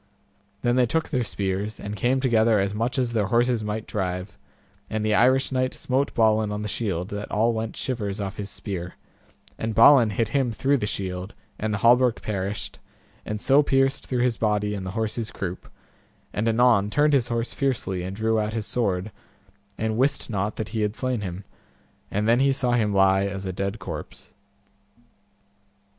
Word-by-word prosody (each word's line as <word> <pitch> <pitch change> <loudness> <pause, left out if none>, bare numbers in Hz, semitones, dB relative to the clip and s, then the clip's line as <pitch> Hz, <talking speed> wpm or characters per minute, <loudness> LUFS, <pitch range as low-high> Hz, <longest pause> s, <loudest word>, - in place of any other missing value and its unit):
Then 120 0 +2
they 125 -1 +4
took 160 +7 -1
their 130 -5 0
spears, 100 -1 -2
and 100 +1 -5
came 125 +6 +1
together 115 -4 +3
as 100 +1 0
much 115 +5 -1
as 125 -2 0
their 105 -4 +1
horses 120 +1 +2
might 105 +1 -3
drive, 90 -1 -3 0.5
and 110 -1 -2
the 110 - +2
Irish 130 +5 +4
knight 130 0 0
smote 135 +2 -1
Balin 110 -2 +3
on 105 0 -3
the - - -3
shield, 95 -4 -2
that 105 0 -5
all 115 +3 +2
went 110 0 -4
shivers 110 -6 -3
off 100 -1 -4
his 100 -1 -5
spear, 95 -2 -5 0.6
and 110 -1 -2
Balin 115 0 +7
hit 110 +1 -1
him 130 -2 +1
through 135 +6 +1
the 105 - -2
shield, 95 -1 -4 0.2
and 110 0 -1
the 100 - 0
hauberk 120 +2 +4
perished, 100 -1 -4 0.5
and 105 0 -3
so 140 +6 +5
pierced 135 -1 +1
through 125 -2 0
his 125 -3 +1
body 105 -1 0
and 95 -2 -4
the 95 - -5
horse's 110 0 -2
croup, 95 -1 -6 0.6
and 110 +2 0
anon 115 -3 +4
turned 150 +5 +3
his 130 -4 +3
horse 120 0 -2
fiercely, 120 -9 -1
and 95 +2 -5
drew 110 +1 +1
out 105 0 -2
his 110 -2 -3
sword, 100 -4 -1 0.7
and 110 +1 -1
wist 135 -2 +1
not 100 0 -1
that 110 - -4
he 110 -1 -2
had 105 0 -1
slain 130 -4 -1
him; 95 0 -5 0.7
and 105 +2 -1
then 120 +2 +4
he 135 +1 +4
saw 130 -2 0
him 110 -4 +2
lie 95 0 +3
as 100 0 -5
a 95 - -3
dead 100 +3 -3
corpse. 95 - -8
110 Hz, 185 wpm, -25 LUFS, 100-120 Hz, 0.7 s, Balin